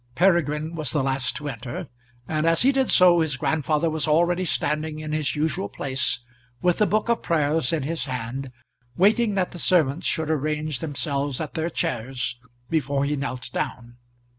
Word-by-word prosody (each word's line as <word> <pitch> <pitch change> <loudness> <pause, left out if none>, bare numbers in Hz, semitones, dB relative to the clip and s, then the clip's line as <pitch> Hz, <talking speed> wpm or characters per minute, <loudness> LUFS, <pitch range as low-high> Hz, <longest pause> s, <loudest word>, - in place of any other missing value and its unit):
Peregrine 160 -3 +2
was 155 -5 -2
the 145 0 0
last 130 -2 0
to 150 +2 -5
enter, 135 +7 -5 0.4
and 155 +1 0
as 165 +4 +3
he 270 - +5
did 265 -2 +1
so 180 -2 +6
his 155 -4 0
grandfather 155 +2 +1
was 155 -1 +1
already 175 +4 +3
standing 155 -2 -1
in 155 0 -5
his 155 -1 0
usual 150 -9 -1
place, 130 -2 -1 0.4
with 180 -1 +1
the 210 - +4
book 215 +2 +1
of 235 -1 +1
Prayers 155 -4 +1
in 160 -4 0
his 165 +3 -3
hand, 130 +1 -4 0.5
waiting 210 +3 +3
that 185 -2 0
the 175 - -8
servants 160 -3 +2
should 160 -1 0
arrange 150 -1 -1
themselves 140 -3 -2
at 155 -3 -4
their 160 +1 -1
chairs 125 -3 -3 0.3
before 140 -2 0
he 145 +1 0
knelt 130 -3 -4
down. 120 -1 -4
155 Hz, 175 wpm, -24 LUFS, 135-165 Hz, 0.5 s, so